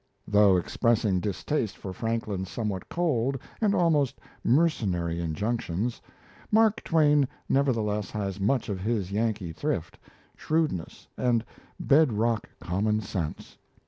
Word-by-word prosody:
Though 105 -2 +5
expressing 105 +1 +1
distaste 105 +4 -2
for 95 - -6
Franklin's 110 -4 -2
somewhat 105 -5 -3
cold 135 -6 0 0.2
and 205 -2 +3
almost 150 -6 +2 0.2
mercenary 100 - +1
injunctions, 100 +5 -2 0.5
Mark 220 0 +4
Twain 150 -4 +4 0.2
nevertheless 110 -7 +1
has 100 -2 -3
much 110 +6 +1
of 100 -3 -3
his 100 -2 -1
Yankee 105 -5 -1
thrift, 90 - -3 0.4
shrewdness, 155 - -2
and 120 -2 +1 0.3
bed 140 -3 +4
rock 115 +2 0
common 105 +4 0
sense. 90 -6 -5
110 Hz, 110 wpm, -27 LUFS, 95-135 Hz, 0.5 s, Though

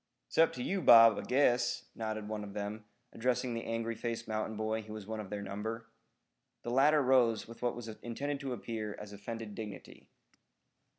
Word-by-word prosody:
"It's - - -3
up 165 - +6
to 125 - -4
you, 195 +5 -1
Bob, 115 -5 +8
I - - -3
guess," 125 -2 +2
nodded 110 -1 -4
one 105 -1 -4
of 100 -1 -9
them, 105 +1 -4 0.3
addressing 125 +1 0
the 115 - -4
angry 115 0 -2
faced 115 0 -4
mountain 110 0 -2
boy 110 +1 -1
who 110 0 -9
was 110 -2 -7
one 110 +1 -4
of 105 -3 -6
their 105 -1 -4
number. 110 +3 -5 0.7
The 120 - -3
latter 145 +3 +5
rose 125 -4 +3
with 115 0 -12
what 120 -1 0
was 120 -1 -7
intended 120 +6 -4
to 135 -2 -3
appear 110 -3 -4
as 105 -1 -9
offended 110 +1 -6
dignity. 105 -2 -9
115 Hz, 190 wpm, -33 LUFS, 110-120 Hz, 0.7 s, Bob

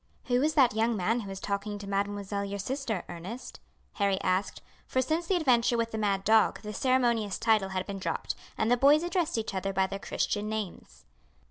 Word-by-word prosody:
"Who 245 0 +1
is 305 +2 +1
that 260 -6 +5
young 225 +1 +1
man 220 +6 +1
who 205 -4 -6
is 195 0 -6
talking 205 +1 -3
to 205 - -8
mademoiselle 200 0 -2
your 200 0 -4
sister, 230 -1 -3
Ernest?" 180 +9 -8 0.3
Harry 200 -2 +1
asked, 185 +2 -1 0.2
for 260 - 0
since 315 +6 0
the 380 - +2
adventure 245 -7 +3
with 230 0 -1
the 220 - -3
mad 200 -2 0
dog 220 +1 +4
the 210 0 -5
ceremonious 235 -4 +1
title 215 -4 +2
had 185 -1 -2
been 200 -1 -5
dropped, - - -2 0.2
and 220 +2 +1
the 245 - +5
boys 290 +5 +5
addressed 345 -5 0
each 220 -2 -3
other 195 +1 -2
by 190 0 +2
their 195 +1 -5
Christian 205 +1 -2
names. 215 -4 -6
215 Hz, 205 wpm, -29 LUFS, 195-245 Hz, 0.3 s, that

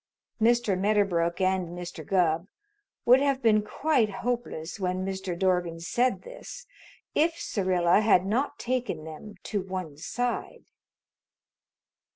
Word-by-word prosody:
Mr. 235 -3 +3
Medderbrook 185 -4 +1
and 185 -2 0
Mr. 175 -2 -7
Gubb 170 0 +1 0.6
would 250 +2 +7
have 275 -1 +1
been 215 -2 +5
quite 245 +2 +1
hopeless 215 -5 -4
when 185 0 -1
Mr. 190 -2 -3
Dorgan 180 -3 +1
said 240 +9 0
this - - -10 0.5
if 330 +2 +2
Syrilla 185 -2 +2
had 200 -4 +4
not 240 +8 0
taken 245 -10 -2
them 160 +7 -9
to 205 - -2
one 185 -6 -5
side. 245 +9 -3
195 Hz, 120 wpm, -27 LUFS, 175-240 Hz, 0.6 s, would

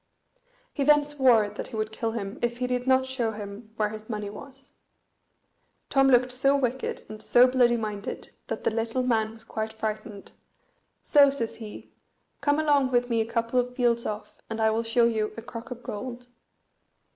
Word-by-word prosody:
He 280 - -1
then 295 +1 +6
swore 260 -7 +4
that 210 - -6
he - - -9
would 215 0 -2
kill 225 0 -2
him 205 0 -5
if 240 0 0
he 250 - -1
did 250 0 -2
not 260 0 +4
show 250 -4 -2
him 210 +1 -8
where 215 -1 0
his 215 +1 -9
money 210 -2 -4
was. 270 +4 -10 1.2
Tom 270 -1 +5
looked 250 -1 +4
so 275 +3 +3
wicked 260 -1 -2
and 215 0 -9
so 245 +3 +6
bloody 250 -2 +3
minded 210 -2 -5 0.2
that - - -4
the - - +2
little 225 +3 -1
man 225 -3 +1
was 225 - -12
quite 220 -1 -4
frightened; 215 -2 -5 0.7
so 285 -2 +6
says 245 -5 -3
he, 215 -2 -10 0.5
"Come 290 +1 +2
along 290 -4 +3
with 245 -1 +1
me 230 -1 +2
a 220 - -2
couple 230 +2 0
of 250 0 -2
fields 235 -2 +1
off, 210 0 -6
and 225 0 -4
I 220 0 +3
will 225 +1 +1
show 230 +1 +3
you 220 -2 0
a 230 - -6
crock 230 -1 -8
of 245 -1 -8
gold." 245 +3 -6
235 Hz, 190 wpm, -27 LUFS, 220-255 Hz, 1.2 s, then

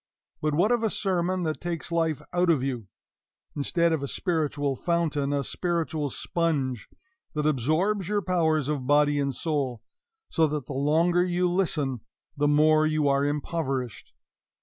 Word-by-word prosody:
But 150 -1 0
what 190 +8 +3
of 240 -1 +2
a 225 - +1
sermon 185 -2 -1
that 155 -2 -2
takes 175 -1 -4
life 165 -3 0
out 175 0 +2
of 150 -6 +3
you, 125 -6 -3 0.7
instead 170 +3 +1
of 160 - -1
a 140 - -3
spiritual 145 -5 -1
fountain, 155 -2 0
a 140 -1 0
spiritual 160 -3 -2
sponge 140 -5 -2 0.5
that 150 0 -1
absorbs 160 - +1
your 205 -1 0
powers 160 -5 +1
of 145 -4 -2
body 145 0 +4
and 140 -2 -1
soul, 140 -7 -2 0.4
so 160 -2 +2
that 150 -3 -3
the 140 - -6
longer 165 +6 +2
you 180 0 +1
listen 155 - 0 0.3
the 145 0 +1
more 155 +1 +4
you 155 -1 +1
are 140 0 +2
impoverished? 140 - -3
155 Hz, 155 wpm, -26 LUFS, 140-170 Hz, 0.7 s, body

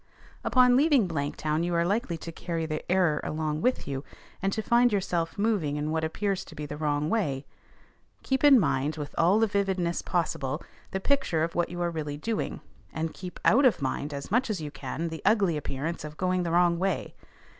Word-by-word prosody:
Upon 250 -1 +5
leaving 275 - +4
Blanktown 155 0 -1
you 175 0 -1
are 170 0 +2
likely 195 -3 0
to 165 - -7
carry 165 0 -3
the 155 -1 -3
error 180 -5 +3
along 155 0 -2
with 250 - 0
you, 135 -1 -3 0.4
and 195 0 +1
to 220 +2 -2
find 240 +1 +4
yourself 180 -4 -1
moving 200 -9 +1
in 150 +1 -2
what 160 0 0
appears 190 +4 -1
to - - -13
be 150 - -5
the 150 - -6
wrong 150 -1 0
way. 150 -10 -1 0.8
Keep 265 +1 0
in 285 -3 +8
mind 150 -4 0
with 145 -1 -6
all 180 +5 +4
the 225 - +4
vividness 190 -4 0
possible, 150 -5 -1 0.3
the 190 - -2
picture 230 - +1
of 165 - -2
what 175 -1 0
you 175 - -6
are 170 - 0
really 150 -3 -4
doing, 225 +8 -3 0.3
and 160 0 -3
keep 180 -1 -8
out 270 +6 +6
of 255 -4 +4
mind 140 +2 -2
as 140 +2 -6
much 245 +3 +2
as 210 -4 -1
you 150 -2 -5
can 165 +3 -4
the 160 0 -7
ugly 195 -5 +3
appearance 150 +3 -3
of 150 0 -8
going 185 0 +1
the 170 -2 -2
wrong 170 0 +3
way. 190 -2 -1
170 Hz, 205 wpm, -28 LUFS, 155-200 Hz, 0.8 s, in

